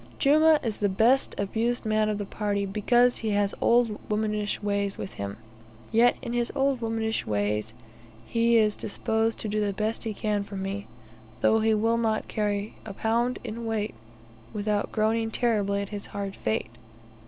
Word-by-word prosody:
Jumah 310 Hz, +2 st, +5 dB
is 220 Hz, -3 st, -2 dB
the 205 Hz, -, +2 dB
best 230 Hz, +8 st, +3 dB
abused 230 Hz, +5 st, -1 dB
man 215 Hz, 0 st, +2 dB
of 210 Hz, -, -1 dB
the 205 Hz, -, -3 dB
party, 200 Hz, 0 st, -2 dB
because 240 Hz, +5 st, +3 dB
he 220 Hz, -, -2 dB
has 200 Hz, -1 st, +1 dB
old 235 Hz, -3 st, +3 dB
womanish 210 Hz, -1 st, -1 dB
ways 200 Hz, -1 st, 0 dB
with 190 Hz, -, -6 dB
him, 100 Hz, 0 st, -5 dB, 0.5 s
yet 235 Hz, +2 st, +4 dB
in 235 Hz, -, -4 dB
his 240 Hz, -1 st, 0 dB
old 270 Hz, -2 st, +1 dB
womanish 225 Hz, -1 st, -1 dB
ways 105 Hz, +1 st, -1 dB, 0.5 s
he 230 Hz, -, +3 dB
is 215 Hz, -2 st, +3 dB
disposed 225 Hz, +2 st, -1 dB
to -, -, -4 dB
do 215 Hz, +1 st, 0 dB
the 200 Hz, -1 st, -1 dB
best 215 Hz, +3 st, -2 dB
he 220 Hz, -2 st, -3 dB
can 210 Hz, -1 st, -1 dB
for 200 Hz, 0 st, -9 dB
me, 195 Hz, +1 st, -4 dB, 0.5 s
though 220 Hz, -, +4 dB
he 220 Hz, 0 st, +3 dB
will 225 Hz, +2 st, +2 dB
not 220 Hz, -2 st, 0 dB
carry 205 Hz, -1 st, -2 dB
a 205 Hz, -3 st, -8 dB
pound 235 Hz, +4 st, 0 dB
in 235 Hz, 0 st, -5 dB
weight 215 Hz, -1 st, -1 dB, 0.6 s
without 210 Hz, 0 st, -1 dB
groaning 225 Hz, +1 st, +1 dB
terribly 205 Hz, -4 st, +1 dB
at 200 Hz, -, -8 dB
his 205 Hz, -1 st, -5 dB
hard 200 Hz, -1 st, -5 dB
fate. 110 Hz, +1 st, -2 dB
215 Hz, 175 wpm, -27 LUFS, 200-230 Hz, 0.6 s, Jumah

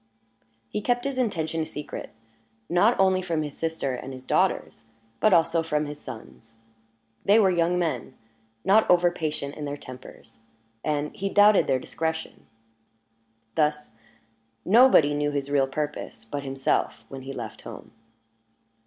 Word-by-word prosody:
He 210 Hz, -, -3 dB
kept 245 Hz, +3 st, 0 dB
his 275 Hz, -2 st, -2 dB
intention 165 Hz, -9 st, -1 dB
a -, -, -1 dB
secret 150 Hz, -, -7 dB, 0.6 s
not 200 Hz, +8 st, +3 dB
only 190 Hz, -1 st, +4 dB
from 165 Hz, -4 st, -1 dB
his 150 Hz, -2 st, -6 dB
sister 160 Hz, -5 st, -2 dB
and 130 Hz, -, -6 dB
his 130 Hz, 0 st, -10 dB
daughters, 115 Hz, -, 0 dB, 0.3 s
but 215 Hz, -, +4 dB
also 165 Hz, -1 st, +4 dB
from 150 Hz, -2 st, -1 dB
his 145 Hz, 0 st, -7 dB
sons; 115 Hz, -2 st, -11 dB, 0.7 s
they 205 Hz, +2 st, +5 dB
were 195 Hz, -4 st, +5 dB
young 175 Hz, 0 st, +2 dB
men, 160 Hz, -10 st, -2 dB, 0.5 s
not 210 Hz, +3 st, +5 dB
overpatient 165 Hz, -5 st, +1 dB
in 150 Hz, -, -5 dB
their 145 Hz, 0 st, -4 dB
tempers, 130 Hz, -3 st, -12 dB, 0.4 s
and 150 Hz, -1 st, -2 dB
he 195 Hz, +1 st, -2 dB
doubted 205 Hz, 0 st, +5 dB
their 130 Hz, -, +3 dB
discretion. 160 Hz, +4 st, -4 dB, 1.1 s
Thus, 150 Hz, -1 st, 0 dB, 0.8 s
nobody 210 Hz, -, +6 dB
knew 145 Hz, 0 st, 0 dB
his 140 Hz, -1 st, -3 dB
real 140 Hz, -2 st, +3 dB
purpose 145 Hz, -5 st, -5 dB
but 140 Hz, +5 st, -4 dB
himself 135 Hz, -4 st, -1 dB
when 135 Hz, +2 st, -8 dB
he 135 Hz, +1 st, -7 dB
left 115 Hz, -5 st, -7 dB
home. -, -, -10 dB
155 Hz, 145 wpm, -26 LUFS, 140-180 Hz, 1.1 s, nobody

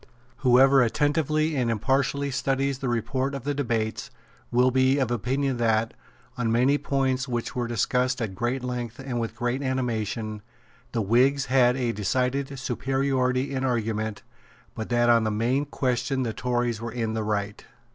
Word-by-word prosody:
Whoever 135 Hz, +1 st, +5 dB
attentively 155 Hz, +4 st, +1 dB
and 125 Hz, -3 st, +1 dB
impartially 135 Hz, +5 st, 0 dB
studies 135 Hz, 0 st, 0 dB
the 130 Hz, -, -2 dB
report 130 Hz, +4 st, -1 dB
of 135 Hz, -, -6 dB
the 145 Hz, +1 st, -1 dB
debates 115 Hz, -6 st, -2 dB, 0.4 s
will 125 Hz, +1 st, +3 dB
be 130 Hz, +2 st, +3 dB
of 130 Hz, -4 st, 0 dB
opinion 130 Hz, +3 st, -1 dB
that, 115 Hz, -1 st, +1 dB, 0.5 s
on 115 Hz, -2 st, +1 dB
many 130 Hz, +5 st, +3 dB
points 130 Hz, -1 st, 0 dB
which 120 Hz, -2 st, -3 dB
were 120 Hz, -1 st, -1 dB
discussed 125 Hz, +3 st, 0 dB
at 110 Hz, -5 st, -3 dB
great 120 Hz, +6 st, -2 dB
length 125 Hz, -2 st, -4 dB
and 130 Hz, -3 st, -4 dB
with 115 Hz, -1 st, -3 dB
great 120 Hz, +2 st, -1 dB
animation, 115 Hz, -5 st, -2 dB, 0.5 s
the 115 Hz, -2 st, -1 dB
Whigs 130 Hz, +7 st, +3 dB
had 125 Hz, -1 st, +4 dB
a 125 Hz, -3 st, 0 dB
decided 130 Hz, +6 st, -1 dB
superiority 135 Hz, 0 st, 0 dB
in 130 Hz, -1 st, -2 dB
argument, 110 Hz, -4 st, -1 dB, 0.5 s
but 110 Hz, -, -6 dB
that 120 Hz, 0 st, +2 dB
on 115 Hz, -1 st, +5 dB
the 110 Hz, -, 0 dB
main 120 Hz, +7 st, 0 dB
question 130 Hz, -1 st, -1 dB
the 115 Hz, -2 st, -2 dB
Tories 120 Hz, -3 st, -1 dB
were 115 Hz, 0 st, -4 dB
in 115 Hz, -2 st, -2 dB
the 110 Hz, -1 st, -2 dB
right. 105 Hz, -1 st, -2 dB
125 Hz, 160 wpm, -26 LUFS, 115-135 Hz, 0.5 s, Whoever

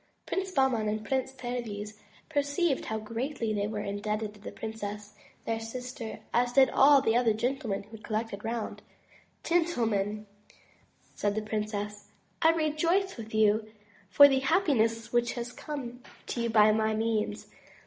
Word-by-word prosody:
Prince 380 Hz, 0 st, -2 dB
Bahman 265 Hz, -9 st, +2 dB
and 215 Hz, +1 st, -3 dB
Prince 265 Hz, -1 st, -1 dB
Perviz 230 Hz, -5 st, -5 dB, 0.3 s
perceived 285 Hz, 0 st, 0 dB
how 220 Hz, -, -2 dB
greatly 230 Hz, +2 st, -3 dB
they 205 Hz, -1 st, 0 dB
were 210 Hz, -1 st, -3 dB
indebted 210 Hz, +1 st, -3 dB
to 210 Hz, -, -17 dB
the 200 Hz, -, -8 dB
Princess, 210 Hz, -1 st, -6 dB, 0.3 s
their 225 Hz, 0 st, -1 dB
sister, 235 Hz, 0 st, -6 dB
as 245 Hz, 0 st, +2 dB
did 265 Hz, -1 st, +6 dB
all 275 Hz, 0 st, +6 dB
the 225 Hz, -, +2 dB
other 240 Hz, -2 st, +4 dB
gentlemen 235 Hz, -2 st, -2 dB
who 210 Hz, -, -22 dB
had 220 Hz, -1 st, -11 dB
collected 215 Hz, -2 st, -3 dB
round. 225 Hz, 0 st, -4 dB, 0.6 s
"Gentlemen," 225 Hz, -, 0 dB, 0.9 s
said 205 Hz, 0 st, -1 dB
the 215 Hz, -, -1 dB
princess, 210 Hz, -1 st, -4 dB, 0.3 s
"I 320 Hz, -, +6 dB
rejoice 330 Hz, +4 st, +1 dB
with 220 Hz, -2 st, -8 dB
you 215 Hz, 0 st, +3 dB, 0.4 s
for 285 Hz, +8 st, +9 dB
the 270 Hz, -1 st, +2 dB
happiness 240 Hz, -, +1 dB
which 240 Hz, 0 st, +2 dB
has 240 Hz, 0 st, -5 dB
come 255 Hz, -4 st, -6 dB, 0.2 s
to 240 Hz, -, -3 dB
you 235 Hz, -, 0 dB
by 215 Hz, -1 st, +6 dB
my 220 Hz, 0 st, +1 dB
means. 220 Hz, -1 st, -1 dB
225 Hz, 150 wpm, -29 LUFS, 215-265 Hz, 0.9 s, for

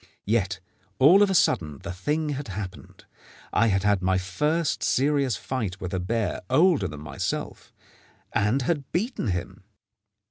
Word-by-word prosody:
Yet 100 Hz, -3 st, 0 dB, 0.4 s
all 165 Hz, -, +7 dB
of 205 Hz, -, +5 dB
a 190 Hz, -, +1 dB
sudden 75 Hz, -, +2 dB
the 100 Hz, -1 st, -5 dB
thing 150 Hz, -, -1 dB
had 145 Hz, -1 st, -4 dB
happened. 95 Hz, -1 st, -8 dB, 0.5 s
I 115 Hz, -, +4 dB
had 95 Hz, -3 st, +1 dB
had 105 Hz, -2 st, +2 dB
my 95 Hz, 0 st, +2 dB
first 150 Hz, -, 0 dB
serious 140 Hz, -3 st, +2 dB
fight 105 Hz, -8 st, -4 dB
with 90 Hz, -1 st, -5 dB
a 95 Hz, -, 0 dB
bear 110 Hz, +4 st, -1 dB
older 155 Hz, -, +4 dB
than 75 Hz, -3 st, -8 dB
myself, 75 Hz, -2 st, -4 dB, 0.6 s
and 115 Hz, +7 st, +1 dB
had 145 Hz, -1 st, -2 dB
beaten 215 Hz, -, -1 dB
him. 90 Hz, 0 st, -4 dB
105 Hz, 150 wpm, -25 LUFS, 95-145 Hz, 0.6 s, all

